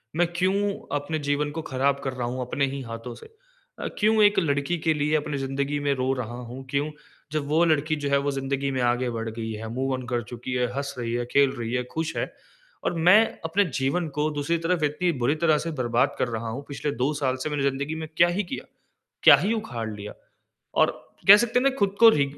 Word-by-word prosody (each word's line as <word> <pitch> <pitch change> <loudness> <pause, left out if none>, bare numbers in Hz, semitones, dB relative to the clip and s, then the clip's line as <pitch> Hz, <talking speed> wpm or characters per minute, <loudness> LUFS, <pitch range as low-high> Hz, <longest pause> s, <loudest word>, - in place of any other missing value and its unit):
मैं 175 +1 +3
क्यों 195 +3 +1 0.2
अपने 155 +2 -3
जीवन 145 0 -1
को 160 +2 -4
खराब 140 0 0
कर 135 - -2
रहा 125 -2 -3
हूँ 125 +1 -3
अपने 130 +3 0
ही 140 - -4
हाथों 115 0 -7
से? - - -13 0.5
अ, - - -3
क्यों 215 +1 +4
एक 205 0 +5
लड़की 145 0 0
के 160 - +5
लिए 150 +1 +1
अपनी 150 -1 -1
जिंदगी 140 +2 -2
में 145 -1 +1
रो 130 0 0
रहा 120 +2 -7 0.2
हूँ? 130 +2 -7
क्यों? 140 +3 -1 0.4
जब 150 -2 -2
वो 155 +3 +3
लड़की 155 -1 +2
जो 145 -1 -3
है 140 - +4
वो 145 - +2
जिंदगी 135 0 -2
में 130 -1 -1
आगे 125 +1 -1
बढ़ 115 -1 -3
गई 110 0 -5
है, 110 +1 -6
मूव 135 +1 -1
ऑन 130 -1 -4
कर 120 -1 -1
चुकी 120 +2 -5
है, 125 -1 +1
हँस 140 0 -3
रही 115 -1 -2
है, 120 0 -1
खेल 140 -1 +4
रही 115 +1 -3
है, 125 - 0
खुश 160 0 -2
है। - - -2 0.5
और - - 0
मैं 210 +5 +8 0.2
अपने 190 +6 +2 0.2
जीवन 150 +6 0
को 150 +1 +2
दूसरी 145 +3 -1
तरफ 175 -3 +1
इतनी 150 +4 +1
बुरी 145 +5 +3
तरह 155 -2 +5
से 165 - -2
बर्बाद 120 +4 +1
कर - - +1
रहा 115 -1 -4
हूँ। 130 +5 -5
पिछले 145 +1 -3
2 145 +3 +1
साल 135 -3 0
से 155 - -2
मैंने 145 -2 -1
जिंदगी 140 +3 -1
में 160 0 -5
क्या 170 - +6
ही 185 +4 -1
किया? 175 - -6 0.6
क्या - - +9
ही 205 - 0
उखाड़ 120 - -4
लिया? 105 0 -7 0.6
और - - +4 0.4
कह 205 - +12
सकते 240 +2 +1
है 250 - +1
ना 275 - +5
खुद 200 -1 +1
को 230 - +10
रि 145 -8 +3
140 Hz, 235 wpm, -25 LUFS, 130-160 Hz, 0.6 s, कह